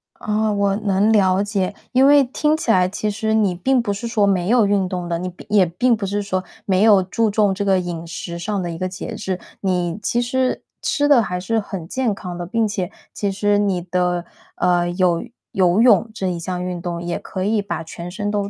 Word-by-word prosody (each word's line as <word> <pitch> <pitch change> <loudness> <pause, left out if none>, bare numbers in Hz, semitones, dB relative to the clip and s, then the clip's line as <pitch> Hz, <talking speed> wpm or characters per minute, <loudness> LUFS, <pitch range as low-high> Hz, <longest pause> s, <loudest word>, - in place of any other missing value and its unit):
啊， 215 0 -1
我 200 -1 +1
能 205 0 +2
了 190 -2 +3
解。 200 -2 -1 0.2
因 260 +1 +5
为 285 0 +7
听 300 +4 +1
起 235 - 0
来 185 -2 +3
其 210 +2 -2
实 220 +1 -1
你 210 -4 +2
并 250 +8 +2
不 205 -3 -2
是 230 +4 -5
说 220 -3 +2
没 185 -2 +1
有 235 -3 +5
运 200 -2 +1
动 180 -2 -4
的， 170 -1 -1
你 185 +1 -3
并 180 - -13
也 205 -3 +5
并 230 +9 +1
不 205 - -4
是 205 +1 -1
说 185 -2 -2 0.2
没 190 0 +2
有 210 -4 +6
注 220 +4 0
重 205 -1 +2
这 200 - -2
个 195 -2 +3
饮 175 -2 -5
食 170 +1 -6
上 205 +2 -2
的 175 - -3
一 165 - -6
个 185 +2 -2
节 185 - -6
制， 185 -1 -3 0.2
你 180 -2 -1
其 240 +4 0
实 255 +1 -1 0.2
吃 290 -2 +1
得 275 -5 +6
还 180 -3 -3
是 225 +5 0
很 190 -5 -6
健 255 -2 0
康 180 -3 -7
的。 175 - -4
并 225 +3 0
且 190 -4 -3 0.2
其 200 -1 -1
实 205 +1 +1
你 195 -4 +1
的 180 0 -1 0.3
呃， 175 -1 +2
有 175 -2 +1 0.3
游 185 +2 +3
泳 235 -2 +4
这 195 -4 -3
一 180 -2 -2
项 180 +1 -4
运 180 -1 -4
动 170 -1 -4
也 175 0 -3
可 185 -1 -5
以 215 0 +1
把 170 -5 -4
全 170 +2 -8
身 205 +2 -3
都 205 -1 -1
195 Hz, 245 characters per minute, -20 LUFS, 180-215 Hz, 0.3 s, 为